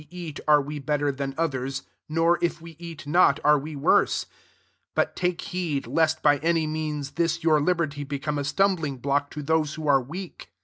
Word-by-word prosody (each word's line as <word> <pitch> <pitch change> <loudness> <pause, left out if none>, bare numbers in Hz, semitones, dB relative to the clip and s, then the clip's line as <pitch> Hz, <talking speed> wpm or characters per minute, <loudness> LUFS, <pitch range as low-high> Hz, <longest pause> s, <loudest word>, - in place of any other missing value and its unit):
eat, 170 -4 -7
are 150 -1 +5
we 145 +1 -5
better 145 0 0
than 135 0 -4
ot 135 -4 -2 0.3
nor, 165 +2 +2
if 175 - 0
we 165 0 -12
eat 170 -3 -9
not, 155 -1 +4
are 150 0 +5
we 150 +2 -7
w\ 140 - +4
9 - - +1 0.9
ftut - - +2
take 180 -2 -1
heed, 165 -6 -3
lest 160 -1 +1
by 145 -1 +4
means 155 -3 -1
this 170 0 -1
your 155 -2 +4
liberty 155 -3 0
a 145 +1 -2
stumbling 160 -2 +1
block 140 +2 0
to 150 - -6
those 155 0 0
are 145 -4 +3
weak. 170 +8 -8
150 Hz, 175 wpm, -25 LUFS, 145-165 Hz, 0.9 s, are